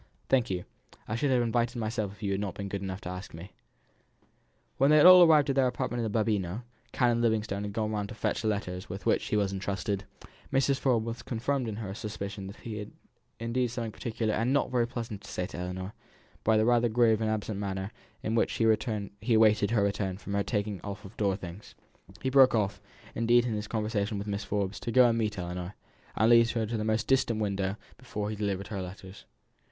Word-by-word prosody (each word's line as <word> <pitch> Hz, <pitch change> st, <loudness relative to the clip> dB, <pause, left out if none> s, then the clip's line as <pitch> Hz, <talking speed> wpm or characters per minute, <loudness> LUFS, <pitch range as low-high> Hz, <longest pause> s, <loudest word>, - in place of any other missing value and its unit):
"Thank 125 Hz, -3 st, +3 dB
you. 90 Hz, -2 st, -3 dB, 0.4 s
I -, -, -3 dB
should 140 Hz, +5 st, 0 dB
have 125 Hz, -2 st, +3 dB
invited 120 Hz, +1 st, 0 dB
myself 110 Hz, -3 st, -2 dB
if 105 Hz, -, -14 dB
you 100 Hz, -, 0 dB
had 100 Hz, +1 st, -1 dB
not 100 Hz, -3 st, -3 dB
been 100 Hz, -1 st, -5 dB
good 100 Hz, 0 st, -4 dB
enough 95 Hz, 0 st, -5 dB
to -, -, -6 dB
ask 90 Hz, -1 st, -7 dB
me." 90 Hz, +5 st, -10 dB, 1.3 s
When 135 Hz, +2 st, +4 dB
they 155 Hz, -, +6 dB
had 150 Hz, -, +7 dB
all 180 Hz, 0 st, +11 dB
arrived 155 Hz, -4 st, +6 dB
at -, -, -2 dB
their 135 Hz, -2 st, +4 dB
apartment 125 Hz, -1 st, -2 dB
in 110 Hz, -, -2 dB
the 110 Hz, -, +1 dB
Babuino 105 Hz, 0 st, -1 dB, 0.3 s
(Canon 120 Hz, -2 st, +2 dB
Livingstone 110 Hz, -3 st, 0 dB
had 100 Hz, -1 st, -5 dB
gone 110 Hz, -1 st, -1 dB
round 105 Hz, -1 st, -2 dB
to -, -, -8 dB
fetch -, -, -1 dB
the 110 Hz, -, -2 dB
letters 95 Hz, -3 st, -3 dB
with 95 Hz, +3 st, -7 dB
which -, -, +2 dB
he 105 Hz, -, 0 dB
was 100 Hz, -1 st, +1 dB
entrusted), 100 Hz, 0 st, -2 dB, 0.5 s
Mrs. 135 Hz, 0 st, +2 dB
Forbes 120 Hz, -5 st, +2 dB
was 115 Hz, 0 st, -5 dB
confirmed 125 Hz, +2 st, -2 dB
in 110 Hz, -, -3 dB
her 105 Hz, -3 st, -5 dB
supposition 100 Hz, -2 st, -6 dB
that 100 Hz, -, -9 dB
he 110 Hz, -3 st, -7 dB
had 115 Hz, +2 st, -9 dB
something 115 Hz, -1 st, -4 dB
particular 110 Hz, -1 st, -2 dB
and 115 Hz, +4 st, +1 dB
not 140 Hz, -1 st, +1 dB
very 120 Hz, -2 st, +2 dB
pleasant 115 Hz, -4 st, -5 dB
to -, -, -12 dB
say 90 Hz, -, -2 dB
to -, -, -8 dB
Ellinor, 95 Hz, +2 st, -5 dB, 0.5 s
by 110 Hz, 0 st, +4 dB
the 110 Hz, -, +3 dB
rather 120 Hz, 0 st, +3 dB
grave 115 Hz, -1 st, +3 dB
and 110 Hz, -, +1 dB
absent 110 Hz, -1 st, -2 dB
manner 95 Hz, 0 st, -3 dB, 0.3 s
in 110 Hz, -, -1 dB
which 115 Hz, -, +2 dB
he -, -, 0 dB, 0.7 s
awaited 110 Hz, -2 st, +4 dB
her 110 Hz, -3 st, +2 dB
return 100 Hz, -2 st, -1 dB
from 100 Hz, 0 st, -2 dB
taking 105 Hz, -4 st, -2 dB
off 100 Hz, 0 st, -6 dB
her 95 Hz, -, -9 dB
out -, -, -16 dB
of -, -, -28 dB
door 100 Hz, -2 st, +1 dB
things. 90 Hz, +1 st, -10 dB, 0.5 s
He 130 Hz, -, 0 dB
broke 130 Hz, -2 st, +6 dB
off, 105 Hz, -3 st, 0 dB, 0.3 s
indeed, 120 Hz, +1 st, +3 dB
in 120 Hz, -, -1 dB
his 105 Hz, 0 st, -3 dB
conversation 105 Hz, -2 st, -1 dB
with 100 Hz, -, -4 dB
Mrs. 105 Hz, 0 st, -3 dB
Forbes 100 Hz, -1 st, -2 dB
to 120 Hz, -, -4 dB
go 125 Hz, +1 st, +7 dB
and 115 Hz, -, +2 dB
meet 105 Hz, -2 st, -1 dB
Ellinor, 90 Hz, +1 st, -5 dB, 0.4 s
and -, -, +1 dB
to -, -, +5 dB
lead 115 Hz, 0 st, +6 dB
her 115 Hz, -1 st, -1 dB
into 110 Hz, +1 st, -2 dB
the 105 Hz, -, -2 dB
most 110 Hz, +1 st, 0 dB
distant 120 Hz, -4 st, +2 dB
window 100 Hz, -2 st, -1 dB, 0.2 s
before 105 Hz, -5 st, -4 dB
he -, -, -3 dB
delivered 100 Hz, -2 st, -2 dB
her 100 Hz, -3 st, -3 dB
letters. 95 Hz, +1 st, -9 dB
110 Hz, 225 wpm, -29 LUFS, 100-115 Hz, 1.3 s, all